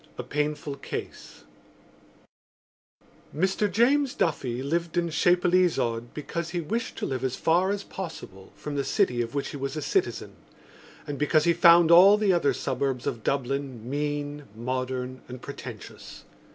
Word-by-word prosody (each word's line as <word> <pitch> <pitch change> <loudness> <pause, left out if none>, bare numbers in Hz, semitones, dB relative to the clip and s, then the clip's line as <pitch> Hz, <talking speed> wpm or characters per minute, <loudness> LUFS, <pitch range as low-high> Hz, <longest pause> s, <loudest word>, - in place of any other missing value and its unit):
A - - -4
PAINFUL 150 -1 -2
CASE - - -7 1.9
Mr 190 +5 +1
James 260 +6 +3
Duffy 130 -6 -1
lived 170 +4 -2
in 170 -1 0
Chapelizod 175 - +2
because 165 +2 -4
he 175 0 -2
wished 225 +8 -3
to - - -3
live 130 -1 -3
as 130 -1 -1
far 175 +4 +2
as 200 0 -2
possible 130 - -8
from 150 - -6
the 140 - 0
city 125 -2 +1
of 115 +3 -5
which 140 - -2
he - - -6
was 140 +2 -4
a - - -2
citizen 390 - -1 0.7
and 145 -2 -5
because 150 +1 +3
he 170 - +4
found 170 -1 +6
all 190 +4 +8
the 210 -3 +2
other 170 -5 +2
suburbs 130 -1 -2
of 115 - -3
Dublin 135 -3 -2
mean, 145 +1 -3
modern 130 +1 -3
and 125 0 -8
pretentious. - - -9
150 Hz, 150 wpm, -26 LUFS, 130-175 Hz, 1.9 s, all